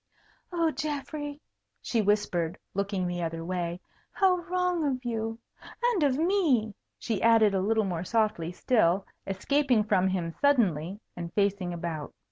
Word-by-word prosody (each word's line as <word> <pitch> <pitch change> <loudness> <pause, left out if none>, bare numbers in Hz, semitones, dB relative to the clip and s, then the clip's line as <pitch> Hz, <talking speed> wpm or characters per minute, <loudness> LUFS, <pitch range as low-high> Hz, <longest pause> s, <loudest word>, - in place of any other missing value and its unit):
"Oh, 335 -2 +1
Geoffrey!" 290 +1 -4 0.4
she 230 - 0
whispered, 190 -5 +1 0.2
looking 200 -1 -1
the 175 0 -2
other 165 0 -3
way, 175 -1 -2 0.3
"how 380 -2 +3
wrong 360 -1 0
of 260 -3 -1
you! 225 -1 -2 0.5
And 480 -7 +2
of 275 -3 +3
me!" 310 - +2 0.2
she 220 -5 -2
added 225 -3 +5
a 190 - +1
little 220 +2 +2
more 175 -3 -2
softly 210 -5 0
still, 190 -2 +2 0.2
escaping 245 +4 +2
from 190 -3 +2
him 180 -3 -1
suddenly, 200 - +2 0.2
and 170 -1 -6
facing 200 -3 +1
about. 165 -3 -5
215 Hz, 140 wpm, -28 LUFS, 180-285 Hz, 0.5 s, added